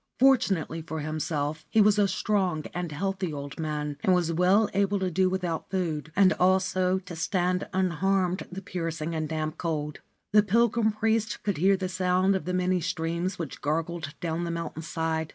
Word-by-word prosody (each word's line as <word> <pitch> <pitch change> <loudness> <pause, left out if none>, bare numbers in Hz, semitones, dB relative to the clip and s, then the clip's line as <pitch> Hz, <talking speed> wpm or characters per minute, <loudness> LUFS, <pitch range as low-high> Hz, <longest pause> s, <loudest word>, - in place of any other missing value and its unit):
Fortunately 220 - +3
for 160 -1 -5
himself, 155 0 -2
he 220 - +2
was 210 0 +5
a 205 - +4
strong 190 -5 0
and 175 -2 -3
healthy 190 +2 -2
old 140 0 -7
man 150 -2 -3
and 185 - +4
was 170 -2 +1
well 185 +5 +4
able 200 +1 +2
to 190 -2 -1
do 185 +2 +2
without 180 -3 -3
food, 160 -5 -2
and 195 -1 +5
also 185 0 +2
to 185 -2 -8
stand 180 +2 0
unharmed 185 +1 0
the 195 +2 -7
piercing 165 -4 -3
and 155 -2 -2
damp 155 0 -3
cold. 150 -3 -3 0.3
The 210 +1 +7
pilgrim 225 +2 +2
priest 220 0 0
could 205 -2 -1
hear 190 +5 +4
the 185 -1 -2
sound 185 +1 +2
of 190 - -3
the 180 - -2
many 180 0 +1
streams 170 +2 -2
which 165 -5 -6
gurgled 160 0 -2
down 170 0 -2
the 170 - -3
mountain 170 -1 -4
side. 160 -1 -2
180 Hz, 180 wpm, -27 LUFS, 160-190 Hz, 0.3 s, The